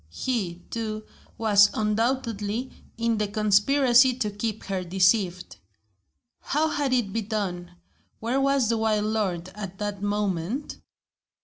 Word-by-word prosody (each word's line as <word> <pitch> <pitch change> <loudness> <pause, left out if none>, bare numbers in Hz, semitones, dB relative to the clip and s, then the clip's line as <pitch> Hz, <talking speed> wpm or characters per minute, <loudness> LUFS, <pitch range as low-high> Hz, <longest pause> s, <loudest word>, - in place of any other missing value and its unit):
He, 180 - -3
too, 215 -2 -4 0.3
was 205 -2 +5
undoubtedly 225 +1 -1 0.3
in 230 -1 0
the 210 - 0
conspiracy 240 +5 +4
to 220 -5 -2
keep 215 +1 -4
her 190 -2 -3
deceived. 185 0 +1 0.8
How 310 +2 0
had 290 -3 -1
it 240 -6 +1
been 225 -3 -2
done? 180 -5 -3 0.4
Where 245 +5 0
was 275 -3 +2
the 230 -1 +1
wild 215 -1 +1
lord, 190 -5 -1
at 195 -1 -8
that 205 -1 -4
moment? 205 - -2
215 Hz, 125 wpm, -25 LUFS, 195-235 Hz, 0.8 s, was